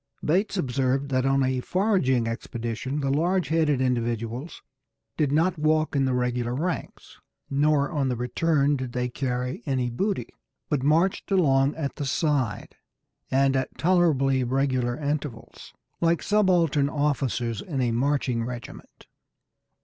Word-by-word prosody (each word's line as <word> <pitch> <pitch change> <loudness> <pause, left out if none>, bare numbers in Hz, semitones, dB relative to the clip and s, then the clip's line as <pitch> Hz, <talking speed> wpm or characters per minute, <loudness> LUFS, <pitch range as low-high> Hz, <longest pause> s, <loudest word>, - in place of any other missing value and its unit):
Bates 195 +6 +1
observed 135 -2 0
that 130 0 +1
on 135 0 +3
a 130 0 0
foraging 165 - +1
expedition 115 +4 -4
the 135 -1 0
large 170 +2 +1
headed 155 -4 +2
individuals 120 +2 -2 0.5
did 145 -3 +1
not 165 +3 +2
walk 155 0 +1
in 135 -1 +2
the 130 -1 0
regular 125 -1 -1
ranks, 170 +5 -4 0.3
nor 145 +1 +2
on 145 -5 0
the 125 - 0
return 145 +4 +1
did 130 -3 -5
they 125 0 -1
carry 125 -1 -3
any 130 -2 0
of 125 - -1
the - - -10
booty, 200 0 -1 0.4
but 145 -4 0
marched 160 +7 +1
along 140 -7 +3
at 140 -4 -4
the 145 - -3
side, 135 - -1 0.5
and 135 0 +2
at 130 -1 -2
tolerably 150 -7 +2
regular 130 -1 0
intervals, 145 -5 -5 0.3
"like 170 0 +1
subaltern 175 -9 +2
officers 135 -6 -1
in 150 -7 -4
a 125 -2 +1
marching 125 -1 0
regiment." 120 - -9
135 Hz, 140 wpm, -25 LUFS, 125-155 Hz, 0.5 s, on